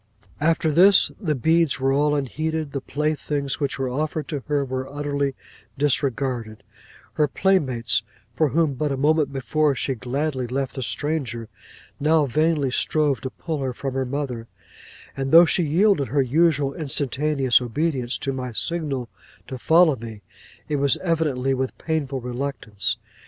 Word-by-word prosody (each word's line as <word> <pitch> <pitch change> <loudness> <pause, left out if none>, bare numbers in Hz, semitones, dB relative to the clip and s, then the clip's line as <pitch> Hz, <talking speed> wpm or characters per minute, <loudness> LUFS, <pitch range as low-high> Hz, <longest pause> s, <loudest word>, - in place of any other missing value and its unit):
'After 160 +1 +2
this, 190 +6 +6
the 160 -8 -1
beads 160 +2 +2
were 135 +1 +2
all 145 +1 +2
unheeded; 155 +2 -2
the 140 - -3
playthings 145 0 -2
which 140 -2 -2
were 135 -1 -1
offered 150 +3 -2
to 145 - -2
her 145 -2 +1
were 130 +1 -4
utterly 140 -1 -2 0.4
disregarded; 130 -5 -1 0.5
her 150 - +2
playmates, 130 - +1 0.3
for 155 +4 +2
whom 160 0 +1
but 145 +2 -2
a 135 - -1
moment 150 0 +2
before 140 +2 +1
she 135 - -1
gladly 130 +2 -2
left 135 +2 -2
the 130 - -5
stranger, 120 -2 -3 0.5
now 155 +1 +3
vainly 150 0 +1
strove 145 +1 +1
to 130 - -4
pull 160 +2 -5
her 130 -2 -2
from 135 +1 -4
her 135 0 0
mother; 130 -3 -4 0.7
and 135 0 -3
though 170 +2 +9
she 175 - +1
yielded 170 -1 +2
her 140 +4 +1
usual 145 0 +2
instantaneous 140 -3 +1
obedience 130 0 -1
to 135 - -2
my 125 -1 -4
signal 145 -3 -2 0.4
to 130 - -6
follow 160 +1 +5
me, 110 -3 -9 0.4
it 150 - -1
was 140 0 +4
evidently 150 -7 0
with 130 0 -3
painful 145 -5 -2
reluctance. 125 -5 -3
140 Hz, 150 wpm, -23 LUFS, 130-155 Hz, 0.7 s, though